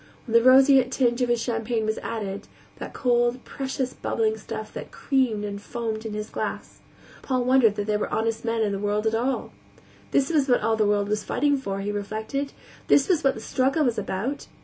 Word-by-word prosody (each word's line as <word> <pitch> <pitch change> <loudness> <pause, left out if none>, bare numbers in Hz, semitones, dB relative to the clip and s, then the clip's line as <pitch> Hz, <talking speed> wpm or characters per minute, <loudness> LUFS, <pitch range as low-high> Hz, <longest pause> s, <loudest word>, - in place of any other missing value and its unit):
When 230 - -6
the 230 - +7
roseate 260 0 +6
tinge 245 -2 +1
of 245 - +1
his 240 -1 +2
champagne 225 -1 -1
was 215 0 -1
added 200 -3 -5 0.3
that - - -7
cold, 240 0 +1
precious, 265 -2 -3
bubbling 440 -1 -1
stuff - - -7
that - - -7
creamed 250 -7 0
and 200 0 -5
foamed 225 0 -4
in 210 - -5
his 210 0 -5
glass - - -5 0.4
Paul 255 -2 0
wondered 250 -4 +4
that 205 - -2
there 210 0 0
were - - -3
honest 225 0 -1
men 230 -1 0
in 210 - 0
the 195 - -2
world 205 +1 -1
at 220 - +1
all. 245 +4 -1 0.6
This 275 +3 +1
was 290 -4 +2
what 245 - +4
all 225 +1 +2
the 215 -1 +2
world 205 -1 +1
was 210 0 -1
fighting 285 +8 +1
for, 195 -8 -3
he 205 +1 -2
reflected; 215 +7 -3 0.4
this 275 - +5
was 355 -5 +2
what 270 -1 +3
all - - -15
the 220 - -8
struggle 270 +7 +1
was 235 -3 0
about. 210 +8 -3
230 Hz, 215 wpm, -25 LUFS, 210-265 Hz, 0.6 s, the